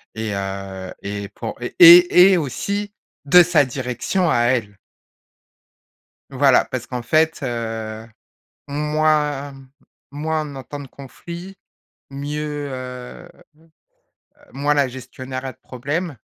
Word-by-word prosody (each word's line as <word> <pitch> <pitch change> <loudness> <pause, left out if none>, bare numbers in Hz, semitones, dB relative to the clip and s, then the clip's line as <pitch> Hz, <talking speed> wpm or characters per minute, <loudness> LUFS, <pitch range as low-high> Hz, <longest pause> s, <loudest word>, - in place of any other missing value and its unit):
Et, 110 -1 -3
heu 95 -1 -5
et 100 0 -5
pour 100 - -7
et 175 +7 +8
et - - +4
aussi, 200 +7 -3 0.3
de 180 +5 +8
sa 170 -4 +3
direction 130 - -2
à - - +2
elle. 110 -6 -1 1.5
Voilà 135 -1 +4
parce 125 -2 -5
qu'en 125 -2 -5
fait, 155 +6 +1
heu, 115 -3 -4 0.6
moins 150 -1 0 0.6
moins 155 +2 -2
on - - -10
entend 135 +2 -8
de 140 - -10
conflits, 170 +8 -10 0.6
mieux, 145 +1 -4
heu, 125 -1 -8 1.2
moins 145 +2 0
la 140 -2 +2
gestionnaire 130 +1 -8
a 130 - -4
de - - -33
problèmes 145 +5 -4
140 Hz, 115 wpm, -20 LUFS, 120-155 Hz, 1.5 s, et